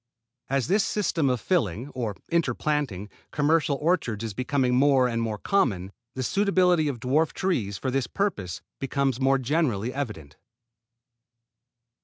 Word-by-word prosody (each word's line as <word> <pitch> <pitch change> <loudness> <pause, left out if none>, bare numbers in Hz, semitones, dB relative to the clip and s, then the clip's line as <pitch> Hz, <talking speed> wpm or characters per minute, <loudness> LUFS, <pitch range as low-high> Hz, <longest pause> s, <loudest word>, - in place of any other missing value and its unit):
As 135 -2 +1
this 200 +4 +2
system 170 -9 0
of 125 -1 0
filling, 125 - 0
or 115 -7 -3 0.2
interplanting, 145 - 0 0.2
commercial 150 -1 +2
orchards 150 - 0
is 110 -2 -4
becoming 130 +2 0
more 135 0 +4
and 115 -1 -1
more 110 -2 -2
common, 100 - 0 0.2
the 130 - -2
suitability 180 -2 +3
of 135 -4 -3
dwarf 145 +7 +1
trees, 110 - -1
for 130 - -2
this 135 -2 0
purpose, 105 - -2 0.2
becomes 135 -1 0
more 135 +1 +4
generally 130 -5 0
evident. 105 - -5
135 Hz, 135 wpm, -26 LUFS, 115-155 Hz, 0.2 s, more